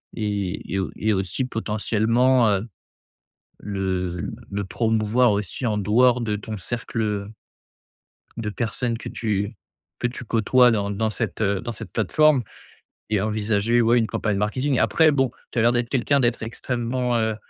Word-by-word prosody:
et 100 -4 -2
et 95 - +1
au 95 - -2
et 110 +1 0
aussi 95 +6 -1
potentiellement, 115 +2 +2
heu, 100 +2 0 0.9
le 95 -3 -2 0.2
le 100 0 -2
promouvoir 110 +3 +2
aussi 105 +5 -3
en 110 -3 +1
dehors 120 +4 +3
de 105 -2 -1
ton 110 +1 -6
cercle, 115 +3 -4
heu 105 0 -2 1.0
de 110 -2 -3
personnes 115 +1 -2
que - - -7
tu 105 -1 -2 0.4
que - - 0
tu 125 0 -8
côtoies 120 +3 +4
dans 100 -2 0
dans 110 +2 0
cette, 110 -2 -4
heu, 100 -2 +1
dans 120 -1 -4
cette 110 - -8
plateforme 140 +6 +3 0.7
et 105 -3 +2
envisager, 110 +2 +1
ouais, 120 +2 +4
une 115 - +2
campagne 105 -2 -1
marketing. 130 +6 0
Après 160 -1 +4
bon, 135 -4 +1 0.2
tu - - -4
as - - +4
l'air 120 +1 +4
d'être 120 -1 0
quelqu'un 140 +2 +2
d'être 120 -2 0
extrêmement, 120 +1 -2
heu, 110 -1 0
110 Hz, 160 wpm, -23 LUFS, 105-120 Hz, 1.0 s, côtoies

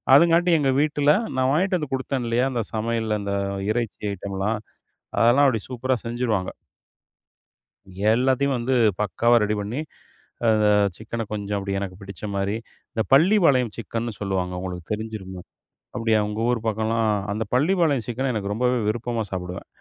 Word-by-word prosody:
அதுங்காட்டி, 170 +3 +5
எங்க 135 -2 +2
வீட்டுல 150 -1 +3 0.3
நான் 130 0 +2
வாங்கிட்டு 185 +3 +2
வந்து 150 -5 -5
குடுத்தேன், 130 -1 -2
இல்லையா? 120 +3 +2
அந்தச் 115 -4 -3
சமையல், 110 -1 -1
இந்த 100 0 -3 0.4
இறைச்சி 115 -1 -3
ஐட்டம்லாம். 100 +2 -2 0.6
அதெல்லாம், 120 +5 +5
அப்பிடி 115 -5 +1
சூப்பரா 130 +1 -1
செஞ்சுடுவாங்க. 115 -5 -1 1.6
எல்லாத்தையும் 130 +3 +2
வந்து, 125 +2 0 0.3
பக்காவா 115 +4 +2
ரெடி 105 +1 0
பண்ணி, 110 +7 -4 0.7
அந்த 110 -1 +3 0.3
சிக்கன 115 +1 -5
கொஞ்சம் 105 -1 -2
அப்பிடி 100 0 -2
எனக்குப் 95 0 -6
பிடிச்ச 100 -1 -10
மாரி. 100 +1 0 0.4
இந்தப் 110 -3 -2
பள்ளிபாளையம் 145 - +4
சிக்கன்னு 115 0 -4
சொல்லுவாங்க. 95 -2 -2
உங்களுக்குத் 90 -1 -6
தெரிஞ்சிருக்குமே? 105 -4 -6 0.5
அப்பிடியா? 115 -2 +2
உங்க 105 +1 -4
ஊர் 120 -2 -1
பக்கம்லாம் 110 +1 0
அ - - +3 0.2
அந்தப் 105 -1 -4
பள்ளிபாளையம் 150 - +2
சிக்கன, 130 +3 -1
எனக்கு 100 -2 -3
ரொம்பவே 125 +3 +1
விருப்பமா 115 +1 -1
சாப்பிடுவேன். 90 -1 -5
115 Hz, 140 wpm, -24 LUFS, 105-130 Hz, 1.6 s, அதுங்காட்டி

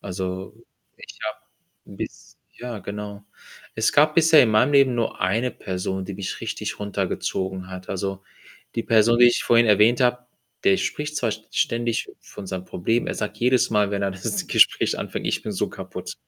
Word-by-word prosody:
Also, 95 0 -5 0.4
ich - - -12
habe 110 0 -4 0.6
bis - - -8 0.2
ja, 120 -2 -6
genau. 100 +1 -7 0.5
Es 110 0 +1
gab 150 +1 +4
bisher 160 -2 +7
in 115 - +2
meinem 125 +7 +3
Leben 135 -3 +5
nur 115 -1 -2
eine 115 +7 +1
Person, 95 0 -4
die 100 - -6
mich 95 0 -5
richtig - - -4
runtergezogen 95 -2 -3
hat. 95 0 -9
Also, 95 0 -3 0.5
die 115 - 0
Person, 115 +1 +4
die 120 - +8
ich 120 - +3
vorhin 115 0 +4
erwähnt 110 +4 +4
habe, 125 0 +1 0.4
der 195 -1 +5
spricht 150 -4 -3
zwar 120 -5 0
st 110 0 -10
ständig 115 0 0
von 100 - -10
seinen 95 -1 -5
Problemen. 115 +7 -1
Er - - -2
sagt 105 0 -4
jedes 125 +1 +2
Mal, 105 -2 +2
wenn 100 0 -2
er 100 - 0
das 95 - -3
Gespräch - - +3
anfängt: - - -4
„Ich - - -1
bin - - -5
so - - -1
kaputt.“ - - -8
110 Hz, 180 wpm, -23 LUFS, 95-120 Hz, 0.6 s, die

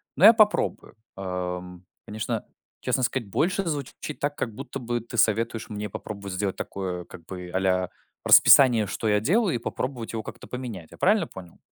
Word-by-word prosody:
но 170 - +5
я 225 - +11
попробую. 215 -2 +2 0.2
Эм, 90 -1 -5 0.2
конечно, 105 0 -3 0.4
честно 130 - 0
сказать, 120 -3 -1
больше 180 - +1
звучит 145 0 -5
так, 145 0 -1
как 115 -6 -3
будто 135 0 -6
бы 120 -1 -2
ты 115 +1 -8
советуешь 115 +1 +1
мне 105 -1 -4
попробовать 100 -1 -7
сделать 95 0 -1
такое 90 -2 -4
как 85 - -12
бы 90 -1 -7
"а-ля 95 -1 +1 0.4
расписание", 120 -6 +7
что 110 - -3
я 105 -1 +3
делаю, 180 - +2
и - - +1
попробовать 125 -1 -4
его 110 -1 -3
как-то - - -10
поменять. 115 -10 -6
Я - - -13
правильно 205 +2 +3
понял? 90 -3 -12
110 Hz, 175 wpm, -26 LUFS, 95-135 Hz, 0.4 s, я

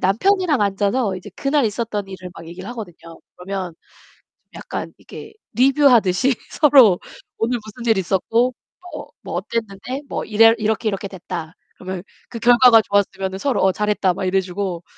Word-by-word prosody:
남편이랑 315 - +2
앉아서 200 +1 0
이제 180 - -10
그날 280 -1 +1
있었던 210 -2 -3
일을 185 -1 -9
막 165 - -11
얘기를 185 +3 -9
하거든요. 175 -8 -10 0.2
그러면 185 -1 -5 0.8
약간 - - -6
이게 - - -12 0.2
리뷰하듯이 255 -4 +4 0.2
서로 260 - +6 0.4
"오늘 240 +2 0
무슨 235 +2 -6
일 220 - +3
있었고 225 +7 +1 0.4
뭐 - - -8
뭐 - - -6
어땠는데 230 +4 -4
뭐 - - -3
이래 225 +1 +5
이렇게, 220 +1 -1
이렇게 200 0 -4
됐다." 175 -3 -7 0.2
그러면 185 -1 -6 0.3
그 230 - -7
결과가 240 -1 +6
좋았으면은 195 -2 -1
서로 270 +1 0
어 190 - +4
"잘했다." 210 -3 0
막 - - -5
이래 190 +1 +2
주고 185 -1 -4
205 Hz, 345 characters per minute, -20 LUFS, 190-240 Hz, 0.8 s, 서로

